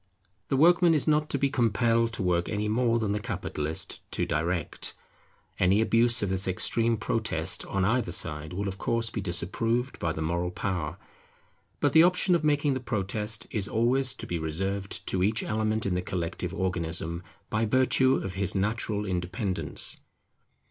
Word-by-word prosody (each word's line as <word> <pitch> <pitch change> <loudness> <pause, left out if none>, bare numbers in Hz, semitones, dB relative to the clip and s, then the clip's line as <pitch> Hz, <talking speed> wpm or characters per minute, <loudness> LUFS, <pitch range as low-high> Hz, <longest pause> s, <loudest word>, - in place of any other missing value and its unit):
The 135 - 0
workman 170 +2 +5
is 145 - +1
not 150 0 +2
to - - 0
be 140 0 +1
compelled 115 -2 +2
to 100 - -3
work 90 -1 +1
any 105 0 -1
more 115 +2 +2
than 110 -3 -1
the 105 - 0
capitalist 80 -6 -3
to - - 0
direct. 85 +2 -2 0.6
Any 95 +3 +4
abuse 115 +1 +4
of 100 - 0
this 95 0 +1
extreme 115 +5 +1
protest 105 -6 -1
on 95 -1 0
either 115 -3 +1
side 75 -1 -2
will 100 +3 -3
of 95 0 -5
course 115 -1 0
be 110 - -3
disapproved 115 +8 -1
by 85 - -1
the 80 - -5
moral 85 +2 -1
power; 90 -4 -3 0.8
but - - +2
the 160 - +8
option 180 +1 +4
of 170 -3 +2
making 145 -1 +2
the 130 - -2
protest 105 -2 -2
is 105 -2 -2
always 125 +4 +1
to - - -8
be 85 - -3
reserved 95 +5 -3
to 95 - -1
each 105 +4 +1
element 110 0 -1
in 100 - 0
the 90 - 0
collective 90 -1 -3
organism, 85 -3 -2 0.3
by 110 +1 +1
virtue 130 +2 +4
of 95 - -3
his 95 +1 -1
natural 105 +1 -1
independence. 95 +2 -2
105 Hz, 170 wpm, -27 LUFS, 90-115 Hz, 0.8 s, the